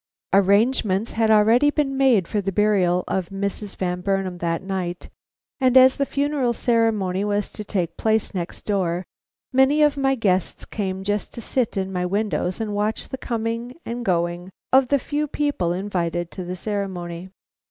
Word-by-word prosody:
Arrangements 200 +1 +3
had 225 -1 +1
already 225 +6 +5
been 290 -2 0
made 255 -10 +3
for 210 - -1
the 195 0 -2
burial 190 -3 +2
of 185 -3 -2
Mrs. 200 +1 -4
Van 180 -1 -2
Burnam 195 -2 -1
that 170 +1 -1
night, 185 -2 -4 0.5
and 260 -1 +4
as 260 0 +7
the 280 - 0
funeral 280 -4 0
ceremony 215 -6 +1
was 205 0 -1
to 210 - -7
take 175 -5 -2
place 220 -1 +1
next 175 -2 -5
door, 185 -3 -1 0.5
many 270 +4 +4
of 295 -1 +3
my 270 -1 +2
guests 190 -6 0
came 190 -3 -4
just 205 +1 -2
to - - -6
sit 235 -2 -1
in 190 0 -2
my 180 -1 -1
windows 185 -2 -1
and 215 -2 -3
watch 210 +2 -2
the 265 - -5
coming 230 +1 -3
and 240 +1 -4
going 175 -1 -1 0.2
of 265 -1 +6
the 280 - +3
few 295 +3 -2
people 285 -13 -1
invited 175 -2 -2
to 185 - -6
the 180 +1 -5
ceremony. 185 -3 -4
205 Hz, 170 wpm, -23 LUFS, 185-240 Hz, 0.5 s, as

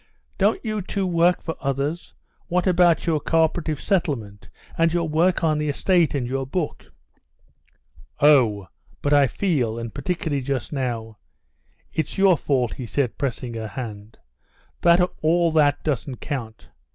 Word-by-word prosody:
"Don't - - +3
you 215 -1 -2
too 195 +1 -2
work 175 0 +2
for 165 - -4
others? 140 +5 -3 0.3
What 180 0 0
about 175 -2 +3
your 160 -2 +1
co 165 +2 +2
operative 155 -2 -1
settlement, 120 - -2 0.3
and 165 0 +2
your 170 -1 0
work 170 +4 +1
on 155 -2 +2
the 150 0 -1
estate, 170 +1 +2
and 130 -3 -1
your 135 +2 -3
book?..." 160 +2 -3 1.3
"Oh, 115 - +4 0.3
but 145 - +2
I 140 -1 +5
feel, 130 - -1
and 115 -1 -6
particularly 145 -1 -2
just 130 0 -3
now—it's 115 - -6
your 195 -2 +5
fault," 130 -6 0
he 125 - -7
said, 130 +1 -1
pressing 125 -3 -3
her 110 -1 -5
hand—"that 110 - -2
all 170 +1 +3
that 145 -2 +2
doesn't 135 -3 -2
count. 115 -7 -6
145 Hz, 140 wpm, -23 LUFS, 125-170 Hz, 1.3 s, I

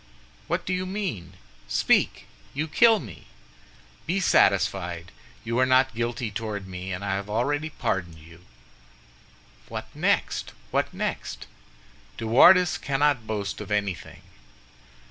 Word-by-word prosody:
"What - - -1
do 185 - -1
you 185 0 -2
mean? 180 - -4 0.3
Speak! - - +2 0.3
you 155 +3 -1
kill 225 +7 +5
me." 100 - -11 0.8
"Be 185 +4 +1
satisfied; 85 - +2 0.3
you 115 +2 -1
are 130 - +5
not 130 +1 +4
guilty 115 0 -2
toward 105 -2 -4
me, 95 0 -6
and 95 +2 -4
I 95 - -1
have 100 +1 -3
already 145 +8 0
pardoned 90 - -3
you." 85 +2 -16 1.3
"What - - -6
next? - - 0 0.2
what - - 0
next?" - - -4 0.7
"De 115 - -4
Wardes 175 +10 +6
cannot 140 -4 +1
boast 105 -1 -3
of 105 - -8
anything." 100 -3 -3
110 Hz, 125 wpm, -26 LUFS, 95-145 Hz, 1.3 s, Wardes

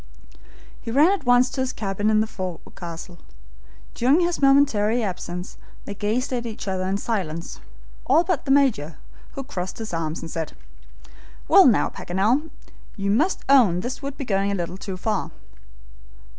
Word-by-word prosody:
He 230 - -7
ran 290 +10 +5
at 390 -10 -3
once 245 +1 +5
to 265 - -2
his 260 -1 -1
cabin 205 -1 -2
in 215 0 +4
the - - +1
forecastle. 175 -3 -8 0.7
During 270 +8 +3
his 345 -2 0
momentary 245 -5 +3
absence 180 -2 -5 0.3
they 205 - -5
gazed 220 +6 -1
at 240 -1 -2
each 220 -1 -7
other 185 -1 -1
in 190 +1 0
silence, 175 -7 -4 0.5
all 300 +6 +5
but 350 -6 -1
the - - -6
Major, 240 - +2 0.4
who 275 - -5
crossed 185 -9 -5
his 220 -4 -6
arms 165 -1 -2
and 165 - -8
said: 160 -2 -4 0.9
"Well, 390 -5 +7
now, 235 - +3
Paganel, 220 - 0 0.5
you 200 0 0
must 310 - +1
own 230 -11 +5
this 250 +6 -5
would 275 0 -6
be 275 - -5
going 195 -2 0
a - - 0
little 175 -1 -4
too 190 -1 -6
far." 210 +1 -2
215 Hz, 165 wpm, -23 LUFS, 185-265 Hz, 0.9 s, Well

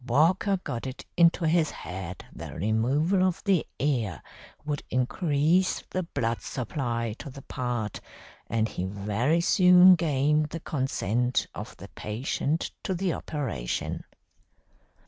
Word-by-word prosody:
Walker 170 - +3
got 125 -2 -4
it 130 - -7
into 170 0 +4
his 160 -1 +3
head 90 +2 -7
that - - -8
removal 130 - +1
of 185 -2 0
the 195 -6 +2
ear 120 -10 -1 0.4
would 145 -1 -2
increase 150 +7 +1
the 185 - 0
blood 120 -9 -2
supply 115 -3 -2
to 145 - -7
the 135 0 -11
part, 120 -4 -3 0.5
and 110 -1 +1
he 90 - -4
very 105 - 0
soon 180 +1 +7
gained 150 -2 +2
the 165 - -5
consent 125 -5 0
of - - -8
the - - -10
patient 135 +8 -2
to 190 - -2
the 180 -1 0
operation. 115 - -3
140 Hz, 125 wpm, -27 LUFS, 115-165 Hz, 0.5 s, soon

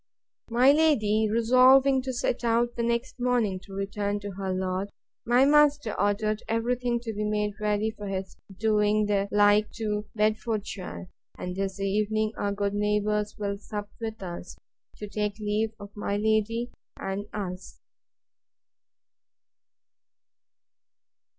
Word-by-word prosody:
My 245 +4 +5
lady 220 -9 +3
resolving 255 +4 +5
to 260 0 -4
set 245 0 -1
out 235 +1 +1
the - - -2
next 235 +2 -1
morning 240 -6 +1
to 195 +1 -16
return 200 +1 -2
to 205 0 -5
her 190 0 -4
lord, 185 +1 -2 0.4
my 245 +3 +5
master 290 -4 +4
ordered 210 +2 0
every 230 +2 +1
thing 245 -1 -1
to 230 -2 -5
be 210 0 -3
made 210 -1 0
ready 210 +1 0
for 210 -2 -8
his 190 -1 -4 0.2
doing 210 0 +2
the 200 -1 +1
like 205 +1 +4
to 210 -2 -3
Bedfordshire; 215 -4 -2 0.3
and 180 0 -5
this 195 0 -3
evening 215 +2 0
our 200 - -1
good 200 0 -1
neighbours 210 0 0
will 200 -1 -3
sup 205 0 -6
with 220 -2 -5
us, 175 0 -7 0.4
to 210 - -7
take 210 0 -2
leave 215 +1 -1
of 205 0 -11
my 205 -1 -2
lady 220 +3 0 0.3
and 195 +2 -4
us. 185 -3 -6
210 Hz, 135 wpm, -27 LUFS, 205-230 Hz, 0.4 s, My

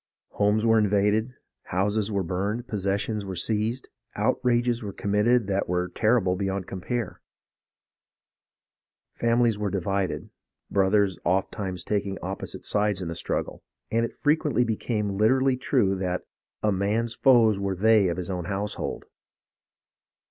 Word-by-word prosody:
Homes 105 +2 +1
were 115 -1 +5
invaded, 105 +4 +1 0.3
houses 105 +3 0
were 100 -2 0
burned, 100 +7 -2
possessions 100 +1 -1
were 95 -1 -5
seized, 110 +7 -1 0.3
outrages 120 +2 +1
were 105 -3 -5
committed 105 +5 +2
that 100 -1 -1
were 90 0 0
terrible 105 -3 +2
beyond 95 -1 -2
compare. 100 +3 -4 1.9
Fam 115 +1 +1
ilies 115 -3 +2
were 105 -1 -1
divided, 95 -1 -2 0.4
brothers 100 -1 +2
ofttimes 95 0 -1
taking 100 -2 -2
opposite 95 +2 -5
sides 105 -2 +1
in 85 - -4
the - - -3
struggle, - - -3 0.3
and 115 +1 +2
it 115 - -4
frequently 150 -4 +2
became 105 -3 -2
literally 130 +4 +3
true 125 -6 +1
that 90 -1 -2 0.4
"a 105 - +3
man's 105 +4 0
foes 115 -6 +4
were 100 -1 -1
they 110 +1 +4
of 85 - -2
his 90 +1 -4
own 90 -2 -3
household." 100 +3 -3
105 Hz, 135 wpm, -26 LUFS, 95-115 Hz, 1.9 s, were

